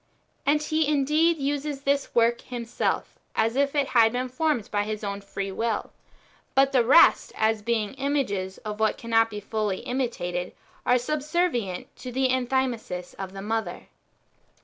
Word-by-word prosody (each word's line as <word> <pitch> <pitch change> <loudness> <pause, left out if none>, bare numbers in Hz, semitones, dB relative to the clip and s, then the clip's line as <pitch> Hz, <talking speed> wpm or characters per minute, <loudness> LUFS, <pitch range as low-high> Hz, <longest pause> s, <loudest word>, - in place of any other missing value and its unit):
And 300 +1 +3
He 310 0 +1
indeed 305 +3 +3
uses 285 0 -2
this 280 0 0
work 235 0 +4
Plimself 240 -2 -2 0.3
as 225 +2 +1
if 280 +1 +1
it 280 -2 +1
had 225 -2 +5
been 250 +1 -2
formed 255 -4 -1
by 205 - +1
His 215 +1 -4
own 200 0 -3
free 195 0 -5
will; 225 +2 -2 0.6
but 270 0 +5
the 255 -3 +4
rest, 275 +8 +6
as 220 -1 +1
being 215 -1 -1
images 265 -9 -1
of 210 0 -4
what 220 -1 +2
cannot 225 -1 +2
be 210 -1 -6
[fully] 205 -2 -2
imitated, 180 -9 -3 0.3
are 250 - +5
subservient 290 - -1
to 250 - -7
the 260 +1 +1
Enthymesis 250 -8 -1
of 190 -1 -5
the 195 0 -7
mother. 215 -4 -3
240 Hz, 155 wpm, -26 LUFS, 210-275 Hz, 0.6 s, rest